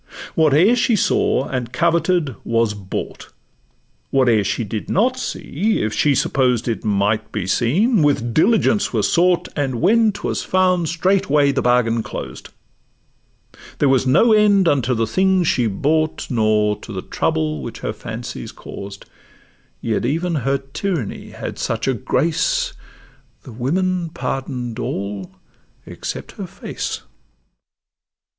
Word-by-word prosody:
Whate'er 160 Hz, -, +4 dB
she 240 Hz, -1 st, +2 dB
saw 155 Hz, -7 st, +1 dB
and 125 Hz, -3 st, -3 dB
coveted 170 Hz, -1 st, +1 dB
was 115 Hz, -2 st, +1 dB
brought; 100 Hz, -2 st, -6 dB, 0.8 s
Whate'er 120 Hz, -6 st, +3 dB
she 100 Hz, +4 st, -1 dB
did 105 Hz, 0 st, -5 dB
not 245 Hz, +7 st, +2 dB
see, 215 Hz, -, -2 dB
if 110 Hz, 0 st, -1 dB
she 145 Hz, -2 st, +2 dB
supposed 125 Hz, -3 st, +1 dB
It 115 Hz, -5 st, -2 dB
might 105 Hz, +1 st, 0 dB
be 105 Hz, -4 st, -3 dB
seen, 170 Hz, -, +2 dB
with 130 Hz, -6 st, +1 dB
diligence 215 Hz, -, +3 dB
was -, -, +1 dB
sought, 180 Hz, 0 st, +3 dB
And 135 Hz, -5 st, -1 dB
when 220 Hz, +5 st, +4 dB
'twas 205 Hz, +1 st, -3 dB
found 185 Hz, -3 st, +1 dB
straightway 165 Hz, -5 st, +2 dB
the 140 Hz, -, 0 dB
bargain 120 Hz, -2 st, +2 dB
closed; -, -, -7 dB, 1.3 s
There 145 Hz, -, +3 dB
was 130 Hz, -1 st, +2 dB
no 220 Hz, -, +5 dB
end 205 Hz, -3 st, +4 dB
unto 130 Hz, -5 st, +2 dB
the 115 Hz, 0 st, +1 dB
things 185 Hz, -, +2 dB
she 125 Hz, -6 st, +2 dB
bought, 155 Hz, +11 st, -1 dB
Nor 110 Hz, -3 st, +2 dB
to -, -, -10 dB
the 95 Hz, -3 st, -5 dB
trouble 75 Hz, -2 st, -1 dB
which 65 Hz, -, -7 dB
her -, -, -3 dB
fancies -, -, -7 dB
caused; 100 Hz, 0 st, -9 dB, 0.8 s
Yet 115 Hz, -2 st, -1 dB
even 165 Hz, +8 st, -1 dB
her 135 Hz, -2 st, 0 dB
tyranny 135 Hz, -, -4 dB
had -, -, -7 dB
such -, -, -2 dB
a 135 Hz, -, +3 dB
grace, 175 Hz, -, 0 dB, 0.7 s
The 130 Hz, -, -11 dB
women 175 Hz, +9 st, -1 dB
pardon'd 125 Hz, -6 st, -4 dB
all 100 Hz, -3 st, -4 dB, 0.5 s
except -, -, -6 dB
her -, -, -5 dB
face. -, -, -5 dB
135 Hz, 135 wpm, -20 LUFS, 115-180 Hz, 1.3 s, no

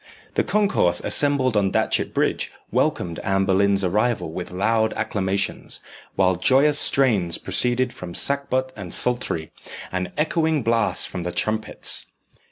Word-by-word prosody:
The -, -, +1 dB
concourse 200 Hz, -, +2 dB
assembled 140 Hz, -4 st, +3 dB
on 100 Hz, -2 st, +2 dB
Datchet -, -, 0 dB
Bridge -, -, -1 dB, 0.2 s
welcomed 85 Hz, -2 st, -1 dB
Anne 95 Hz, 0 st, 0 dB
Boleyn's 100 Hz, +1 st, +2 dB
arrival 105 Hz, -1 st, 0 dB
with 90 Hz, +2 st, -6 dB
loud 110 Hz, +4 st, 0 dB
acclamations, 100 Hz, -1 st, -2 dB, 0.4 s
while 95 Hz, -2 st, +2 dB
joyous 140 Hz, +9 st, +5 dB
strains 105 Hz, -11 st, +2 dB
proceeded 125 Hz, 0 st, -1 dB
from 85 Hz, -1 st, -9 dB
sackbut 130 Hz, -2 st, 0 dB
and 95 Hz, -5 st, -4 dB
psaltery, 120 Hz, -10 st, 0 dB, 0.4 s
and 90 Hz, 0 st, -3 dB
echoing 155 Hz, -2 st, 0 dB
blasts 115 Hz, -1 st, +1 dB
from 90 Hz, -, -6 dB
the 90 Hz, +1 st, -4 dB
trumpets. 110 Hz, +3 st, 0 dB
110 Hz, 130 wpm, -22 LUFS, 95-130 Hz, 0.4 s, joyous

